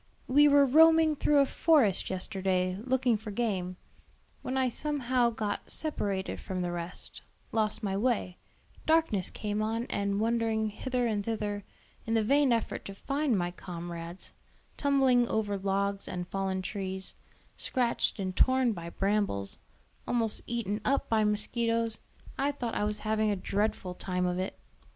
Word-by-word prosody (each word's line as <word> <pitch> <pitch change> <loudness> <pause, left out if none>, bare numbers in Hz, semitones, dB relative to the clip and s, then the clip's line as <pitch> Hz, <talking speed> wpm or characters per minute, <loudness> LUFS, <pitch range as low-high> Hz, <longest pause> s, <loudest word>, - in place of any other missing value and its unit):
We 290 +3 +6
were 285 -1 +6
roaming 320 +2 +6
through 295 +1 +2
a 280 - +6
forest 270 - +3
yesterday, 185 -1 -1
looking 255 -2 +2
for 215 +1 -8
game, 195 -5 -2 0.6
when 260 - -3
I 260 -1 +2
somehow 255 -2 0
got 215 -3 -4
separated 200 -11 -1
from 185 -2 -4
the 175 - -2
rest, 175 0 -7 0.3
lost 215 -1 0
my 195 -2 -1
way, 205 -4 -1 0.5
darkness 315 - +2
came 210 0 -3
on, 225 +2 -1
and 200 0 -1
wondering 225 -1 0
hither 250 +3 -2
and 210 -3 0
thither 205 -2 -3 0.4
in 225 - +1
the 220 - +3
vain 280 +3 +3
effort 230 -1 -1
to 195 - -7
find 275 +1 0
my 175 -1 -1
comrades, 170 0 -8 0.4
tumbling 265 -4 +3
over 210 -3 -1
logs 200 0 -1
and 180 -1 -4
fallen 190 -1 -2
trees, 190 -1 -5 0.4
scratched 245 -3 -1
and 185 -1 -3
torn 260 -2 +3
by 170 -3 -7
brambles, 195 - +1 0.5
almost 225 -3 +2
eaten 220 -3 -2
up 275 +1 0
by 220 -1 +3
mosquitos, 230 +1 +1 0.4
I 280 +1 +1
thought 240 -5 -4
I 210 - 0
was 210 0 0
having 215 0 0
a 205 - +1
dreadful 195 -1 -2
time 180 0 -2
of 180 0 -1
it. 185 - -4
215 Hz, 150 wpm, -29 LUFS, 195-250 Hz, 0.6 s, We